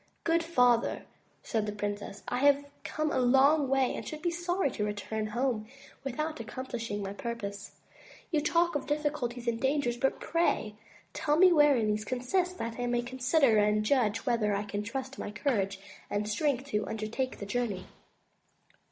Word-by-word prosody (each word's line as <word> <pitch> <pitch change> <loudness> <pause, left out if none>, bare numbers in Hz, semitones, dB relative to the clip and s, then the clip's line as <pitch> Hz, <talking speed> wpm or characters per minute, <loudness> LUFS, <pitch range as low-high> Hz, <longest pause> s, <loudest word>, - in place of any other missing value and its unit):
"Good 335 0 +3
father," 250 -8 +3 0.4
said 220 -3 -1
the - - -1
princess, 205 -1 -5
I 245 - -1
have 285 +1 +4 0.2
come 310 0 -1
a - - +1
long 270 +4 +5
way 270 -1 +2
and - - -5
should 310 +1 -7
be 345 - +1
sorry 345 -2 0
to 210 - -3
return 210 +1 -3
home 235 -1 -1 0.4
without 305 +4 -3
accomplishing 230 -3 -4
my 195 0 -4
purpose. 205 -2 -5 0.6
You 310 -3 +2
talk 340 +3 +2
of 290 - -3
difficulties 290 -5 -2
and 230 0 0
dangers, 265 -3 +1
but 270 +2 0
pray 335 -10 0 0.4
tell 295 0 +1
me 365 +1 +7
wherein 290 -7 +5
these 210 0 0
consist, 350 - -1
that 230 -4 -4
I 245 - -1
may 240 0 +1
consider 250 -1 +3
and 210 +1 +2
judge 225 -3 +2
whether 225 -5 +1
I 200 - -1
can 205 0 -3
trust 265 +4 -5
my - - -4
courage 205 -3 -1 0.3
and 210 +1 -1
strength 260 +4 0
to 210 -5 -1
undertake 220 +4 -3
the 200 - -6
journey." 205 -3 -2
245 Hz, 170 wpm, -30 LUFS, 215-290 Hz, 0.6 s, me